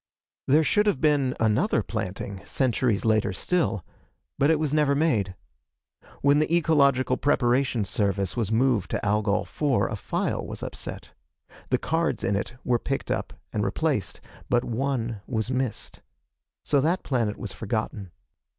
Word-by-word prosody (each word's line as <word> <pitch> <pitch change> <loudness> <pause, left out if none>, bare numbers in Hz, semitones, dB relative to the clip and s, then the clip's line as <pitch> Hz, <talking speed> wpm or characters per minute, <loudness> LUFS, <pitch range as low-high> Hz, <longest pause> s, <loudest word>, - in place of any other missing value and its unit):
There 150 +4 +5
should 210 +6 +2
have 205 - +2
been 145 -4 +2
another 110 -1 +2
planting, 95 +1 -4
centuries 120 -5 0
later 110 -2 +2
still, 110 - 0 0.5
but 140 - +4
it 160 - +4
was 150 -2 -1
never 150 -2 +3
made. 110 - +1 0.9
When 140 +1 +5
the 155 - 0
Ecological 140 -6 +3
Preparation 125 -4 +2
Service 100 -2 -1
was 115 -4 -1
moved 115 -3 +2
to - - -2
Algol 105 0 +1
IV, 145 -4 0
a - - -2
file - - -2
was - - -7
upset. - - -6 0.6
The - - +3
cards 160 -7 -1
in 100 - +1
it 100 +5 -3
were 120 -1 +2
picked 135 +3 -3
up - - -2 0.2
and - - 0
replaced, - - -1 0.3
but 120 0 +3
one 120 -3 -2
was 115 -1 -2
missed. 125 -4 -3 0.6
So 140 -2 +3
that 170 +6 +1
planet 115 -6 0
was 105 - -6
forgotten. 110 -3 -3
125 Hz, 150 wpm, -26 LUFS, 105-145 Hz, 0.9 s, There